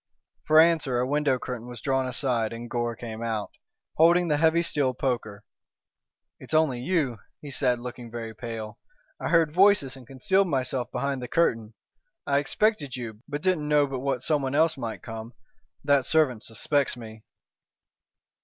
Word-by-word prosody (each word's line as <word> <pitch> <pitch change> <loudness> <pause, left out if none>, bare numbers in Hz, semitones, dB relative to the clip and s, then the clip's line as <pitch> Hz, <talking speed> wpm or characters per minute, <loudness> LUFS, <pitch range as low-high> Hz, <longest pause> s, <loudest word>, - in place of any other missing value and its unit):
For 155 0 +6
answer 160 -6 +4
a 125 - +1
window 145 -1 +1
curtain 125 -2 -6
was 120 -2 -8
drawn 135 0 0
aside 120 -3 -1
and 115 +1 -7
Gore 120 -1 -2
came 110 -1 -7
out, 110 -3 -3 0.5
holding 170 +2 +5
the 150 - +2
heavy 165 +2 +3
steel 140 -6 0
poker. 115 -6 -3 1.0
"It's - - -4
only 155 -6 +3
you," 135 - 0 0.2
he 145 - -9
said, 125 -2 +1
looking 120 -1 -8
very 115 -1 -6
pale. 110 -1 -7 0.4
"I - - -3
heard 165 -3 +3
voices 185 -8 +4
and 130 -3 -14
concealed 190 +9 +1
myself 130 -4 -1
behind 135 +1 -2
the 125 - -5
curtain. 115 -10 0 0.5
I 140 0 +2
expected 150 - 0
you, 115 -4 -7
but 150 +1 -5
didn't 180 -5 +1
know 150 -1 +4
but 135 -2 -4
what 130 -2 -2
someone 140 -3 0
else 160 +1 +3
might 115 -4 -6
come. 115 +1 -7 0.5
That 140 -2 +3
servant 145 -8 +2
suspects 130 +4 -1
me." 110 -2 -10
130 Hz, 165 wpm, -26 LUFS, 120-150 Hz, 1.0 s, For